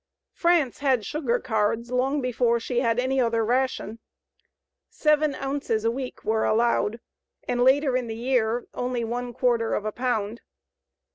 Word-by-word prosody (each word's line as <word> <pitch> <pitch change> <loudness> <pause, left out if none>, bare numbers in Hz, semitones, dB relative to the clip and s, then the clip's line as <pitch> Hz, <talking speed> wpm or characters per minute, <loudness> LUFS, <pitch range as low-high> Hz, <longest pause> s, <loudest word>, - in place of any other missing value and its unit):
France 335 -7 +2
had 260 -6 +1
sugar 265 -4 0
cards 225 0 -1
long 265 +3 +1
before 240 -1 +1
she 240 +1 -1
had 230 -2 +1
any 260 +1 +1
other 230 -2 +1
ration. 245 -2 -1 0.9
Seven 300 -2 +2
ounces 270 -5 -2
a 230 - +3
week 255 +1 -6
were 220 +1 +1
allowed, 230 0 +1 0.5
and 245 0 +1
later 265 +1 +4
in 250 -2 -1
the 225 - -5
year 240 -1 0
only 245 -1 -2
one 245 +2 -3
quarter 240 -2 +1
of 210 - -3
a 215 - -1
pound. 235 -2 -2
245 Hz, 150 wpm, -25 LUFS, 230-260 Hz, 0.9 s, later